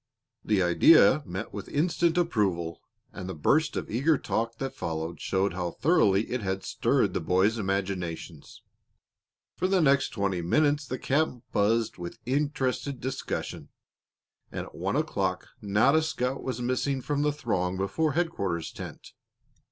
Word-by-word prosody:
The 105 -3 +2
idea 100 - +6
met 100 +5 -5
with 105 0 -7
instant 170 +2 +1
approval, 95 - 0 0.3
and 95 - -6
the 95 - -5
burst 155 - +2
of - - -3
eager 140 +7 +2
talk 115 -1 -2
that 135 +2 -4
followed 80 +1 -4
showed 95 +1 0
how 90 -1 -2
thoroughly 110 - +3
it 125 -1 -1
had 95 -1 -2
stirred - - +1
the - - 0
boys' 100 +5 +2
imaginations. 95 -6 -4 0.9
For 185 - +1
the 190 0 +3
next 140 -4 +3
twenty 100 -4 -1
minutes 145 - +2
the 130 - -3
camp 135 -3 0
buzzed 110 0 +1
with 85 0 -6
interested 140 0 -1
discussion, 130 +2 -4 0.8
and - - -4
at - - -14
one - - -2
o'clock - - -1
not 105 +7 +3
a 160 - +5
scout 135 -4 -2
was 125 -2 -4
missing 130 +2 -1
from 145 -1 -1
the 150 0 +2
throng 95 -11 -1
before 135 +11 0
headquarters 100 - -1
tent. - - -9
115 Hz, 150 wpm, -28 LUFS, 95-145 Hz, 0.9 s, idea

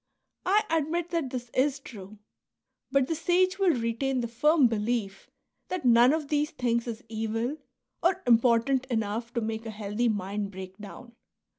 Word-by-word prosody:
I 415 +3 +4
admit 330 +2 0
that 330 -6 -1
this 245 -2 -6
is 275 +2 +2
true; 210 -5 -11 0.7
but 275 -1 +3
the 325 - -2
sage 365 +4 +1
will 350 -10 +3
retain 245 +3 -1
the 235 - -2
firm 295 +5 +3
belief 215 -3 -1 0.4
that 365 -6 -4
none 240 +1 +6
of 305 -2 -2
these 300 0 +1
things 235 -4 -1
is 230 0 -5
evil, 225 +5 -2 0.4
or 370 +2 +1
im 235 -2 +6
portant 250 +2 +2
enough 225 -1 -2
to 235 - -1
make 220 +1 -4
a - - -4
healthy 215 +2 -1
mind 205 0 -2
break 190 -1 -9
down. 215 +4 -10
240 Hz, 165 wpm, -28 LUFS, 225-295 Hz, 0.7 s, none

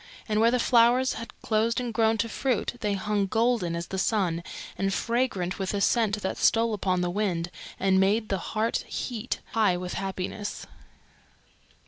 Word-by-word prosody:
And 215 -1 +1
where 230 - +6
the 250 - +2
flowers 245 +2 +4
had 230 +1 -7
closed 225 +2 +1
and 245 -2 -3
grown 225 0 +3
to 230 - 0
fruit 245 0 -1
they 205 -3 0
hung 205 0 0
golden 225 -5 +1
as 170 0 -3
the 190 - -4
sun 185 -5 0 0.3
and 195 0 0
fragrant 205 -5 -1
with 190 +1 -2
a - - 0
scent 210 -1 +1
that 190 - -2
stole 230 0 +3
upon 185 -3 0
the 175 0 0
wind 175 -4 -1 0.3
and 190 0 +3
made 210 +3 +2
the 195 - 0
heart 220 +5 -1
heat 240 -1 -4
high 210 -6 +2
with 180 0 -5
happiness. 195 +2 -4
210 Hz, 170 wpm, -27 LUFS, 190-230 Hz, 0.3 s, where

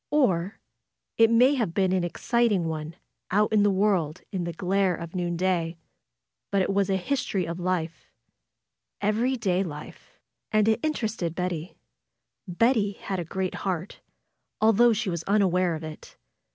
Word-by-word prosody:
Or 200 - +1 0.6
it 225 -1 +7
may 245 +4 +5
have 225 -11 -1
been 190 -2 +2
an 185 -1 +1
exciting 205 0 +1
one 155 0 -5 0.3
out 210 +3 +2
in 210 - +5
the 205 - +4
world 190 -6 +1
in 185 -3 -2
the 170 - -3
glare 185 +1 +1
of 170 0 -8
noonday. 175 -1 -1 0.7
But 195 -1 +2
it 195 - -1
was 200 -1 +1
a 195 - +2
history 200 -3 -1
of 170 +2 -5
life; 175 -2 -3 0.9
every 225 +6 +1
day 190 -5 +1
life. 150 -4 -10 0.3
And 215 0 +3
it 220 +1 +3
interested 220 - -2
Bet 180 0 -1
ty. 165 +1 -6 0.7
Betty 205 +2 +2
had 195 -1 -4
a - - -2
great 185 +3 -3
heart, 185 -1 -3 0.6
although 225 +2 +5
she 215 -3 -1
was 170 -1 -3
unaware 185 -4 +2
of 155 - -7
it. 155 -1 -10
190 Hz, 155 wpm, -26 LUFS, 175-215 Hz, 0.9 s, it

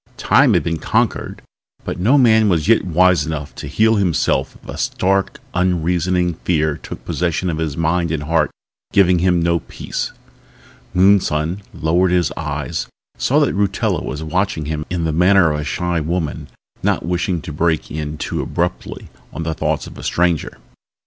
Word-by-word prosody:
Time - - +4
had - - +2
been 85 -1 -2
conquered - - -1 0.4
but - - -4
no 120 +10 +4
man 110 -5 +5
was 85 -2 +1
yet 115 0 +4
wise 90 0 +3
enough 75 -4 -5
to 75 - -8
heal 110 +9 +3
himself 85 -8 0
if - - -16
a - - -6
stark, 95 +1 0 0.2
unreasoning 90 0 +1
fear 80 -4 +1
took - - -9
possession 90 +1 -1
of 80 - -4
his 75 -4 -2
mind 85 +1 +1
and 80 -2 -2
heart, 80 0 +1 0.4
giving 90 -3 +4
him 90 0 +2
no 85 0 +2
peace. - - -5 0.8
Moonson 90 -2 +3
lowered 85 +4 +1
his 90 -1 +1
eyes, 75 +1 -3 0.3
saw 140 - +2
that 145 - +2
Rutella 100 -1 0
was 75 +1 -5
watching 80 -1 -1
him 75 0 -4
in 85 -1 -2
the 80 -1 0
manner 90 0 +4
of 75 - -2
a - - -3
shy 85 +2 -1
woman 80 -2 -3 0.3
not - - 0
wishing 90 0 -1
to 75 - -7
break 80 +1 0
in 75 0 -4
too - - -3
abruptly 85 +1 -3 0.2
on 80 - -5
the 80 0 -2
thoughts - - -1
of - - -11
a - - -9
stranger. 85 -3 0
85 Hz, 170 wpm, -19 LUFS, 80-90 Hz, 0.8 s, man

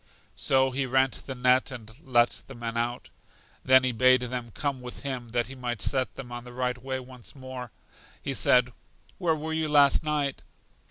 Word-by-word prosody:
So 130 0 +3
he 130 +1 -1
rent 130 -2 +1
the 135 - -4
net 125 +1 +3
and 115 -4 -9
let 120 -5 +2
the - - -10
men 115 -1 -5
out. 120 +1 -2 0.5
Then 130 0 +6
he 130 - +1
bade 130 +2 +4
them 125 -1 -4
come 140 +2 -3
with 125 0 -9
him, 130 -4 -4
that 120 0 0
he 135 - -9
might 120 -4 -4
set 130 +4 -1
them 125 -3 -8
on 120 0 -6
the 125 0 -11
right 125 0 -2
way 130 0 -3
once 125 +1 -11
more. 130 -3 -8 0.5
He - - -3
said: 125 0 +4 0.5
Where 170 -4 +2
were 155 +1 -4
you 160 -1 -1
last 145 -1 +5
night? 150 -3 -1
130 Hz, 195 wpm, -27 LUFS, 120-135 Hz, 0.5 s, Then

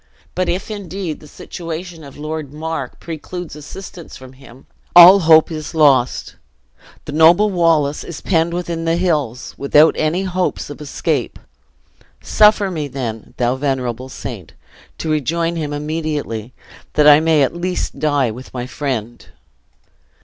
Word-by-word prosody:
But 185 -1 -1
if, 185 +5 -3
indeed, 195 -5 -5
the 150 - -15
situation 165 +2 -8
of 140 -2 -12
Lord 155 -1 -5
Mar 160 +2 -4
precludes 170 +1 -7
assistance 170 +3 -10
from 130 0 -13
him, 130 -1 -16 0.3
all 180 +3 +10
hope 160 -2 +5
is 155 +1 -6
lost! 140 -5 +2 0.7
The - - -6
noble 170 +7 +5
Wallace 165 -5 +1
is 170 - -8
penned 165 -2 +1
within 170 -1 -3
the 165 0 +1
hills, 135 -9 -1
without 150 +3 +5
any 160 +5 0
hopes 185 -5 -2
of 145 - -10
escape. 145 - -2 0.8
Suffer 200 - +3
me, 155 -4 -3
then, 120 -5 -6
thou 125 +1 +1
venerable 130 -2 -3
saint! - - -8 0.4
to 160 - -3
rejoin 165 +3 -1
him 155 -3 -3
immediately, 145 -6 -4 0.4
that 150 0 +4
I 150 0 +8
may 160 -2 +3
at 135 - -1
least 180 +1 -3
die 145 -6 +1
with 125 +4 -10
my 125 -1 -3
friend!" 125 -4 -5
155 Hz, 140 wpm, -18 LUFS, 140-170 Hz, 0.8 s, all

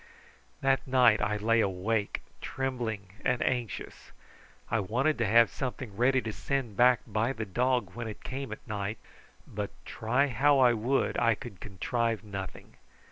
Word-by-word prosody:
That 135 0 +2
night 125 -4 +5
I 105 0 +1
lay 115 +2 +2
awake 100 +2 0 0.2
trembling 120 -7 -3
and 125 -1 +1
anxious. 120 -4 -3 0.6
I 115 - +1
wanted 125 +9 0
to 115 - +2
have 115 +3 +5
something 125 -5 -5
ready 130 +3 +3
to 110 - -4
send 135 -5 -2
back 125 +2 +5
by 110 +4 0
the 110 -2 -4
dog 120 -1 0
when 120 0 -5
it 110 - -8
came 135 -1 -5
at 110 - -8
night, 105 0 -3 0.5
but 105 -1 -4 0.2
try 120 +5 +1
how 140 +2 +3
I 125 -2 +6
would 120 +5 0
I 115 -1 +3
could 115 -4 -10
contrive 115 +3 -1
nothing. 100 -3 -8
115 Hz, 155 wpm, -29 LUFS, 105-130 Hz, 0.6 s, I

